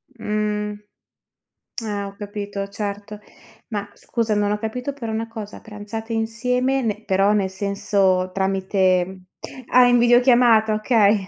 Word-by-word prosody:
Mh. 210 -1 -2 1.1
Eh 205 -2 -3
ho 195 - -7
capito, 205 -1 -5
certo. 205 +1 -6 0.5
Ma 205 -2 -4
scusa, 225 -3 -2
non 205 0 +1
ho 210 - 0
capito 250 +5 -4
però 235 -5 -5
una 225 +1 -2
cosa, 220 -3 -8
pranzate 220 +2 -7
insieme, 250 +4 0
ne 215 -1 -2
però 195 +1 +3
nel 195 -2 +1
senso 190 -1 0
tramite 190 -1 +1 0.5
Ah, 250 0 +6
in 245 - +5
videochiamata, 240 -2 +5
okay, 215 -2 +3
210 Hz, 130 wpm, -22 LUFS, 200-225 Hz, 1.1 s, Ah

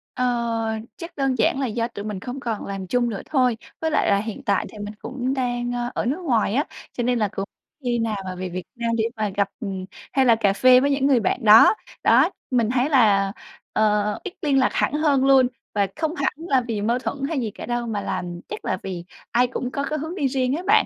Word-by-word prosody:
Ờ, 230 -3 0 0.2
chắc 335 0 -9
đơn 270 -2 +1
giản 265 - +2
là 270 - 0
do 230 +1 -1
tụi 205 -3 -8
mình 210 -3 -4
không 250 +6 -6
còn 230 -5 -3
làm 195 -2 -5
chung 245 +1 +1
nữa 205 - -4
thôi, 255 -6 +2 0.2
với 320 -1 0
lại - - +2
là 200 - +4
hiện 215 +1 -5
tại 200 -1 +1
thì 215 - -12
mình 205 +1 -6
cũng 260 0 -3
đang, 245 -2 -1
ơ, 240 0 -2
ở - - -2
nước 285 +9 -1
ngoài 230 - +1
á, 290 - +2 0.3
cho 245 - -2
nên 245 -1 +1
là 210 - +2
cũng 195 0 -4 0.4
khi 240 -1 0
nào 220 -2 -1
mà 185 -1 -5
về 185 0 -4
Việt 180 0 -5
Nam 235 -1 -1
để 220 - +1
mà 215 -2 -1
gặp, 200 -1 +1
ừm, 190 -4 -4 0.3
hay 265 -1 +3
là 235 -2 +6
cà 200 -3 +2
phê 255 +4 +6
với 280 +2 +1
những 275 0 +2
người 260 -4 +4
bạn 225 +4 -1
đó. 220 - +8 0.3
Đó, - - +5 0.2
mình 235 -3 +2
thấy 255 +3 +2
là, 205 -8 +4 0.4
ờ, 210 -1 +2
ít 385 - -6
liên 280 -3 +3
lạc 255 - +3
hẳn - - +1
hơn 290 -3 +2
luôn 265 -2 +6 0.3
và 200 -2 +2
không 315 +2 -2
hẳn 280 -1 0
là 290 -6 +1
vì 215 -3 -2
mâu 235 +4 +1
thuẫn 280 - -3
hay 320 - -1
gì 225 -4 -2
cả - - -8
đâu 240 0 -2
mà 210 -3 -2
là - - -3 0.3
chắc - - -6
là 185 - 0
vì 185 -3 -5 0.3
ai 245 +1 +3
cũng 250 0 -4
có 280 - -2
cái 305 +1 -2
hướng 320 +5 -5
đi 280 -7 +1
riêng 260 0 0
á 350 - -4
bạn. 430 +2 +5
240 Hz, 250 wpm, -23 LUFS, 210-270 Hz, 0.4 s, đó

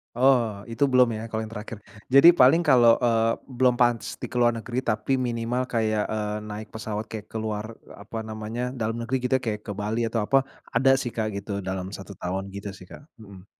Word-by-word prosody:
Oh, 120 -5 +2
itu 115 +3 -1
belum 125 -1 +6
ya, 110 - -5
kalau 110 - -2
yang 110 0 -6
terakhir. 105 0 -7 0.3
Jadi, 165 +6 +8
paling 135 +2 +6
kalau, 120 -4 +6
eee, 115 -2 +2 0.2
belum 125 -1 +1
pans 120 -2 +1
di - - -5
ke 130 - -13
luar 120 -1 +4
negeri, 120 +4 -3
tapi 110 +4 0
minimal 120 0 -1
kayak, 110 -2 +1
eee, 105 -1 -2
naik 105 0 -7
pesawat 110 -1 -5
kayak 110 -2 -8
ke - - -4
luar, 110 0 -4 0.2
apa 110 +3 -7
namanya. 110 +3 -5
Dalam 115 -1 -2
negeri 120 +3 -2
gitu. 130 +1 +2
Kayak 110 -4 -4
ke - - -6
Bali, 105 +3 -2
atau 115 0 -1
apa. 135 -1 +4 0.3
Ada 135 +2 +4
sih, 120 -3 -5
Kak, 110 -1 -1
gitu. 100 0 -5
Dalam 95 +1 -4
1 95 +1 -10
tahun. 95 +2 -4
Gitu 100 0 -7
sih, 90 - -13
Kak, 145 - -12 0.2
mhm. 100 -2 -13
115 Hz, 205 wpm, -25 LUFS, 105-125 Hz, 0.3 s, Jadi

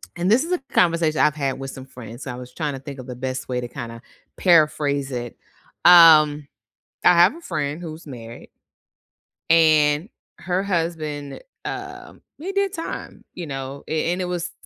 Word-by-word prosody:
And 175 +3 0
this 245 +6 +4
is 335 - -6
a 360 - +1
conversation 165 -3 +2
I've 150 -1 +3
had 135 -3 -2
with 135 0 -6
some 130 - -10
friends, 120 -1 -10
I 125 - -4
was 125 0 -10
tryna 145 -4 -4
think 140 -2 -8
of 130 - -9
the 125 - -6
best 130 +1 -4
way 125 -1 -1
to 120 - -5
kinda 115 -1 -8 0.4
paraphrase 150 -5 +2
it. 120 -1 -5 0.5
Um, 155 -4 +7 0.6
I 180 - +7
have 175 +7 +5
a - - -11
friend 155 - -3
who's 160 -1 -8
married 115 -4 -10 1.0
and 155 +1 +4 0.3
her 185 +1 -2
husband, 165 -6 -3 0.2
um, - - -7 0.2
he 350 +6 -5
did 395 0 0
time, 330 - -7
you 175 -3 -7
know, 135 0 -6
a 160 +2 -1
and 185 - -3
it - - -1
was 180 -1 -3
150 Hz, 170 wpm, -22 LUFS, 135-175 Hz, 1.0 s, Um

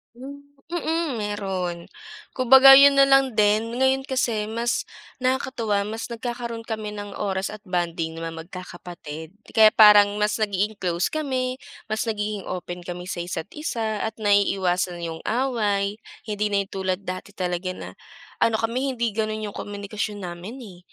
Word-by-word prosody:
Hmm, 275 +3 -9 0.3
mm, 335 -1 -1
meron. 190 -4 -3 0.5
Kumbaga, 265 +1 +8
'yon 280 0 +7
nalang 270 -2 +5
din. 215 +2 +2
Ngayon 265 +1 +2
kasi 235 -5 0
mas 235 +3 -1 0.3
nakakatuwa, 250 -5 0
mas 220 +2 -5
nagkakaroon 235 -1 -5
kami 215 -2 -5
ng 205 0 -6
oras 195 -2 -2
at 215 - -8
bonding 170 -2 -2
ng 165 - -6
mga 165 - -4 0.2
magkakapatid. 175 -2 -9 0.2
Kaya 220 -1 +7
parang 205 -1 +7
mas 210 +1 0
nagiging 205 0 -1
close 175 -1 -1
kami, 260 -4 -2 0.3
mas 220 +2 -1
nagiging 210 -2 -3
open 180 -1 -5
kami 180 0 -5
sa 180 - -4
isa't 175 +1 -4
isa, 225 -8 -3
at 220 +1 -3
naiiwasan 185 -4 +1
yung 165 -1 -5
away, 215 -4 0 0.2
hindi 210 -1 -2
na 200 -1 +1
yung 195 - -19
tulad 190 -1 -2
dati 185 +2 -6
talaga 180 0 -2
na - - -8 0.5
ano 230 - +2
kami, 255 +4 -1
hindi 235 -1 0
gano'n 215 -1 -2
yung - - -13
komunikasyon 205 0 -5
namin 180 +8 -7
eh. 190 -7 -11
210 Hz, 150 wpm, -24 LUFS, 190-235 Hz, 0.5 s, Kumbaga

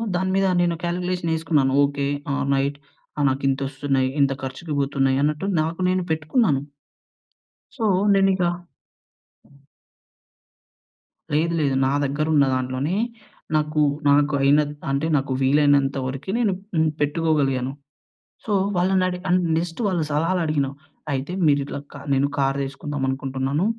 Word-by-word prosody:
దాని 190 +1 0
మీద 195 0 +2 0.2
నేను 170 -1 +1
కాల్కులేషన్ 180 -1 -2
ఏసుకున్నాను 150 -5 +1
ఓకె. 140 0 -1 0.3
ఆల్‌రైట్. 140 0 0 0.4
ఆ! - - 0
నాకింతొస్తున్నయి, 135 0 0
ఇంత 140 -1 +3
ఖర్చుకి 150 +4 -5
బోతున్నాయి 135 -1 +1
అన్నట్టు, 150 +5 0
నాకు 165 +2 -3
నేను 185 0 +1
పెట్టుకున్నాను. 155 - +1 1.2
సో, 225 - -1 0.3
నేనిగ 195 -1 +3 2.9
లేదు 165 +3 +1
లేదు. 140 -3 +1
నా - - +1
దగ్గరున్న 145 +1 +2
దాంట్లోనే 130 +6 -2 0.6
నాకు, 150 0 +1 0.3
నాకు 145 +1 +3
అయినత్ 145 +2 +3 0.2
అంటే 140 +3 0
నాకు 135 0 -2
వీలైనంత 140 0 +3
వరకు 135 +5 -6
నేను 225 -4 +2 0.2
హ్మ్, 160 -1 +3
పెట్టుకోగలిగాను. 145 -4 +1 0.7
సో 215 - -1 0.2
వాళ్ళని 185 +1 +2
అడి 180 0 -3
అండ్ 180 0 +3
నెక్స్ట్ 165 +3 -3
వాళ్ళు 180 -4 0
సలహాలడిగిన 155 -2 +1 0.4
అయితే, 135 +4 -3 0.2
మీరు 145 -1 +3
ఇట్లా 140 - -5 0.3
నేను 135 +1 +2
కార్ 135 0 +1
దీసుకుందాం 140 +1 -5
అనుకుంటున్నాను, 135 +4 -1
145 Hz, 120 wpm, -23 LUFS, 135-165 Hz, 2.9 s, ఇంత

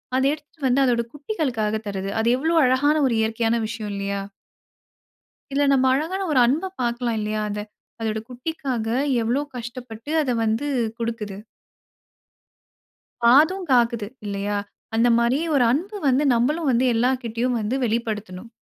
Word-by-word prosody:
அத 260 - +2
எடுத்துட்டு 300 -1 -8
வந்து 260 +2 +3
அதோட 240 -2 +2
குட்டிகளுக்காக 270 - -2
தருது. 195 -1 -3
அது 225 - +1
எவ்வளோ 320 +5 0
அழகான 265 +4 +3
ஒரு 245 - 0
இயற்கையான 225 +1 +1
விஷயம் 215 -2 -5
இல்லையா? 200 0 -2 1.3
இதுல 285 +1 +2
நம்ம 265 -1 +3
அழகான 330 +8 -1
ஒரு 285 - +3
அன்ப 320 +10 0
பாக்கலாம். 240 -1 -1
இல்லையா? 215 0 -2
அதை 210 0 -3 0.4
அதோட 220 -1 -1
குட்டிக்காக 255 -2 -4 0.4
எவ்ளோ 240 +5 0
கஷ்டப்பட்டு 240 +1 -8
அதை 260 -4 0
வந்து 225 +6 0 0.3
குடுக்குது. 225 -4 -4 1.9
பாதும்காக்குது, 255 - +4 0.2
இல்லையா? 205 0 -2 0.4
அந்த 235 +2 +4
மாரி 235 +3 +2 0.2
ஒரு 265 -3 +4
அன்பு 370 - -2
வந்து, 265 +2 +3
நம்மளும் 290 +6 +1
வந்து, 245 +1 +2
எல்லார்கிட்டையும் 245 0 0
வந்து 215 +4 -1
வெளிப்படுத்தணும். 220 -3 -3
240 Hz, 130 wpm, -23 LUFS, 220-275 Hz, 1.9 s, பாதும்காக்குது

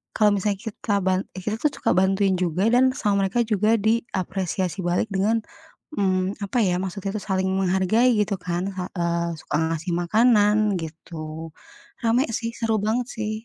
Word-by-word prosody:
kalau 210 -1 +4
misalnya 200 0 -1
kita 205 -1 -1
ban 185 0 +2
kita 200 +3 -3
tuh 300 - +4
suka - - 0
bantuin 190 +1 +3
juga 180 +2 0
dan 260 +1 +5
sama 200 -6 +1
mereka 240 +5 -1
juga 215 +1 +2
diapresiasi 190 -5 -1
balik 175 +5 0
dengan 210 +4 +2 0.6
mmm, 185 -1 0
apa 235 +5 -1
ya, 180 -1 +1
maksudnya 195 +1 -4
tuh - - -11
saling 190 -1 0
menghargai 190 +5 +2
gitu 210 -1 +1
kan, 180 +2 -2
sa 185 -1 -3
eee, 170 0 0
suka - - -4 0.2
ngasih 165 +2 -4
makanan 210 +2 +4 0.2
gitu. 160 0 -7 0.6
Rame 235 +4 +3 0.2
sih, 230 -1 -3
seru 225 -1 0
banget 235 +3 0
sih. 215 -1 -2
195 Hz, 160 wpm, -24 LUFS, 185-220 Hz, 0.6 s, dan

